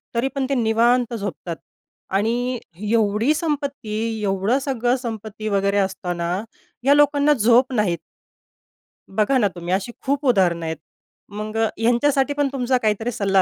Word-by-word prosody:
तरी 235 +3 +1
पण 275 -1 0
ते - - +1
निवांत 235 +1 +2
झोपतात 195 -5 -4 0.6
आणि 240 +4 0 0.3
एवढी 220 +4 +2
संपत्ती, 275 -8 -2
एवढं 195 +6 +1
सगळं 255 -3 0
संपत्ती 220 -3 -6
वगैरे 200 0 +1
असताना, 180 -3 -1 0.5
ह्या 275 +2 +5
लोकांना 290 0 +4
झोप 245 +1 +3
नाही. 205 -7 +1 1.2
बघा 220 +6 +3
ना, 220 -5 +3
तुम्ही 175 +1 -3
अशी 195 +5 -1
खूप 280 +2 0
उदाहरणं 175 -8 +2
आहेत. 160 0 -3 0.5
मग 215 +1 -5
अ, 225 - +3
ह्यांच्यासाठी 265 +4 +2
पण 290 0 +1
तुमचा 255 -1 +1
काहीतरी 220 0 0
सल्ला 195 -3 +2
225 Hz, 140 wpm, -22 LUFS, 200-260 Hz, 1.2 s, ह्या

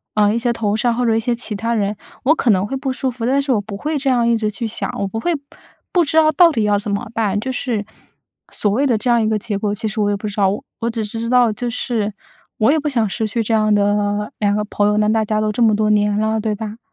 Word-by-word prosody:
呃， 210 -1 +3
一 230 - 0
些 240 0 0
同 210 -3 -1
事 225 - -3
啊， 235 - +2
或 245 +1 0
者 225 -1 +2
一 - - +2
些 240 +2 0
其 230 -3 -5
他 230 +3 -1
人， 210 -2 0 0.3
我 305 +5 +4
可 255 - 0
能 190 0 +1
会 270 - -3
不 265 0 -2
舒 265 0 -2
服， 240 -2 -5
但 265 +3 +2
我 215 - +1
不 205 -1 -7
会 305 +6 -2
这 275 -1 -1
样 240 -2 +2
一 235 -1 +3
直 215 -1 -1
去 230 +2 -3
想， 220 - -3
我 200 - -1
不 195 - -5
会， 345 +9 0
不 285 - -7 0.5
不 355 - +4
知 310 +2 -1
道 315 -1 +6
到 335 +3 +6
底 225 -8 0
要 205 -1 +2
怎 205 0 -5
么 200 +4 -2
办。 210 -3 0
就 260 +5 -3
是 235 -5 -2 0.7
所 210 - 0
谓 260 +8 +1
的 235 - +2
这 215 +4 -2
样 235 -1 +4
一 220 - +1
个 215 -1 0
结 205 0 -3
果， 205 0 -1
其 215 +2 -3
实 215 +1 -4
我 205 - +2
也 - - +1
不 210 - -5
知 205 - -6
道。 195 -2 +3 0.3
我 230 - 0
只 225 -1 -3
是 215 +2 -5
知 230 - -3
道， 245 -2 +4
就 240 +3 -3
是 225 -4 -2 0.5
我 220 +5 +4
也 315 - +2
不 300 - -3
想 230 -6 0
失 220 +2 -2
去 230 +2 -1
这 220 - -4
样 215 -1 +3
的 205 0 +1
2 205 -1 +2
个 210 - 0
朋 205 0 0
友， 210 - +2
那 210 0 +2
大 220 0 +2
家 215 0 0
都 215 0 0
这 210 - -6
么 220 -2 +4
多 215 0 +1
年 210 -1 +2
了， 220 +1 0
对 215 0 -1
吧？ 215 0 -6
220 Hz, 325 characters per minute, -19 LUFS, 210-240 Hz, 0.7 s, 道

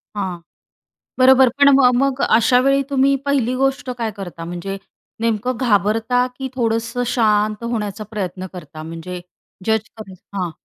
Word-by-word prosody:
हां, 185 -4 -3 0.8
बरोबर. 260 0 +6
पण 280 0 +6
मग 250 -2 +5
मग 275 -1 0
अशावेळी 255 +4 +3
तुम्ही 275 0 +3
पहिली 255 -3 +1
गोष्ट 270 -1 0
काय 225 -2 -1
करता? 175 -4 -7
म्हणजे 175 +3 -5 0.4
नेमकं 230 +2 0
घाबरता 225 +2 +2
की 265 -1 -4
थोडंसं 230 0 -1
शांत 215 -1 +1
होण्याचा 215 -2 -3
प्रयत्न 185 -3 -4
करता, 155 -3 -9
म्हणजे 165 +3 -7 0.5
जज 220 +1 +1
करायचं 200 -2 -12
हां. 175 - -2
225 Hz, 135 wpm, -19 LUFS, 195-255 Hz, 0.8 s, बरोबर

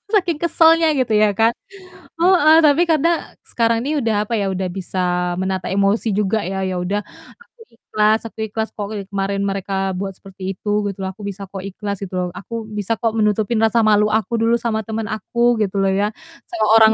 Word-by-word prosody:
saking 350 -6 +1
kesalnya 330 -1 +4
gitu 245 -4 0
ya 210 - +5
kan, 225 +1 +4 0.7
heeh. 335 -3 +5
Tapi 295 +3 +4
kadang, 325 +2 +3 0.3
sekarang 230 -1 +1
ini - - -2
udah 225 -2 0
apa 230 - -5
ya, - - 0
udah 185 0 -2
bisa 185 0 -6 0.4
menata 190 0 -2
emosi 200 +4 +1
juga 210 +2 +1
ya, 190 +1 -4
ya 185 - -3
udah 200 +3 -1 0.4
aku 470 0 -24
ikhlas 215 -1 +1
aku 225 - -10
ikhlas 220 +1 -3
kok 205 -1 -5
dari 200 -2 -5
kemarin 195 0 -2
mereka 195 0 -3 0.2
buat 195 0 -4
seperti 190 -1 -7
itu 210 - -6 0.2
gitu 195 - -7
loh, - - -2
aku 210 - -15
bisa 195 0 -7
kok 195 -2 -7
ikhlas 200 +1 -5
gitu 195 -1 -7
loh, 180 0 0
aku 225 +4 -6
bisa 210 +2 -1
kok 225 -1 -1
menutupin 215 +1 +1
rasa 225 0 +3
malu 210 0 +4
aku 220 +1 -1
dulu 230 +1 +3
sama 220 -2 -1
temen 220 0 -3
aku 235 +2 0
gitu 200 -1 -1
loh 195 - +2
ya, 210 - +1 0.4
sama 220 -2 0 0.2
orang 220 0 +7
215 Hz, 200 wpm, -19 LUFS, 195-230 Hz, 0.7 s, orang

